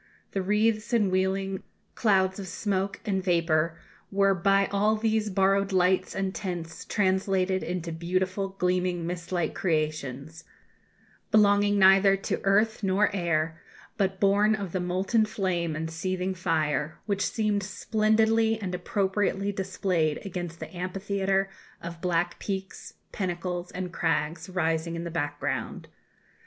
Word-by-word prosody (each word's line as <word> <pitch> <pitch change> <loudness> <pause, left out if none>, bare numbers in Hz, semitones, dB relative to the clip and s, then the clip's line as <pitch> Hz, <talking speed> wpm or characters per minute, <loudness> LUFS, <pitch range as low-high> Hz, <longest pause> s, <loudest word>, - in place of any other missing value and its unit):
The 195 - -1
wreaths 215 +4 +1
and 210 -5 +3
wheeling 190 +1 0 0.3
clouds 190 -3 +2
of 195 - -6
smoke 195 +1 -2
and 190 -3 0
vapour 165 -2 +1 0.3
were 195 0 +3
by 195 +2 +3
all 210 +2 +2
these 220 -1 0
borrowed 195 +1 +2
lights 185 0 +2
and 195 -1 -1
tints 175 -4 -5
translated 190 -1 +1
into 175 -1 -3
beautiful 185 +4 -1
gleaming 180 -2 0
mist 170 0 -5
like 175 -4 0
creations 155 -3 -2 0.9
belonging 205 -1 +4
neither 195 0 +6
to 195 - -3
earth 210 +3 +2
nor 200 +1 +2
air, 165 -2 -1 0.3
but 190 -4 0
born 205 +2 +4
of 200 -5 -5
the 185 - -1
molten 185 +5 +1
flame 180 -6 -1
and 160 +1 -4
seething 185 +3 -2
fire 155 -4 -1
which 200 -1 0
seemed 210 -2 0
splendidly 220 +2 +2
and 185 -4 -4
appropriately 195 +2 0
displayed 185 -5 0
against 175 -3 -5
the - - -8
amphitheatre 195 +1 -1 0.3
of 170 0 -8
black 175 -1 0
peaks, 190 -1 -5 0.2
pinnacles, 180 -1 -3
and 180 -1 -5
crags 165 +1 -1
rising 165 -2 -1
in 170 - -4
the 170 - -5
background. 145 -6 -3
190 Hz, 130 wpm, -27 LUFS, 170-200 Hz, 0.9 s, neither